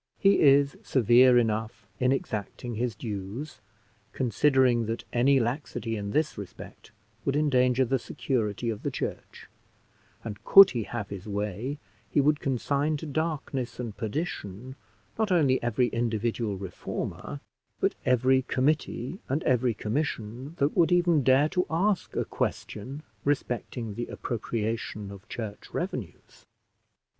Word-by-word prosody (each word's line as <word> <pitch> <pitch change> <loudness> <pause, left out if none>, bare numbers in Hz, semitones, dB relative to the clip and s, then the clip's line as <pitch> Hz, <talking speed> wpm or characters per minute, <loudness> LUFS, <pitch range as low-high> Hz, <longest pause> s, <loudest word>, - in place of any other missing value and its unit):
He 195 0 +4
is 140 0 +5
severe 125 0 +5
enough 110 -2 0
in 125 0 +3
exacting 120 -1 -3
his 115 0 -2
dues, 105 +6 -6 0.5
considering 125 -1 +3
that 115 +1 -3
any 135 +3 +4
laxity 120 -2 -2
in 100 -1 -4
this 155 +1 0
respect 100 -3 -10 0.3
would 140 - 0
endanger 130 -3 +3
the 135 +2 +1
security 115 -2 -2
of 105 - -6
the - - -1
church; - - -5 0.8
and, 105 -3 -7
could 195 -1 +9
he 120 - -2
have 115 -4 -5
his 100 0 -7
way, 105 +7 -3 0.3
he - - +2
would 150 +1 +3
consign 140 +3 0
to 160 - -7
darkness 145 -5 -3
and 115 -4 -4
perdition, 120 - -4 0.4
not 220 -3 +1
only 140 -7 +3
every 120 +1 +1
individual 115 -2 -1
reformer, 95 -2 -5 0.4
but - - +2
every 130 +1 +3
committee 135 +3 -1
and 145 +5 0
every 125 -2 +2
commission 125 +3 -3
that 140 +1 +1
would 175 -1 +4
even 175 -3 +4
dare 130 +3 +4
to 180 +2 0
ask 185 +3 0
a - - 0
question 135 +8 -4 0.2
respecting 120 -5 -2
the 120 +3 -4
appropriation 110 -3 -3
of 100 +3 -12
church 110 -4 -6
revenues. - - -6
125 Hz, 130 wpm, -28 LUFS, 110-140 Hz, 0.8 s, could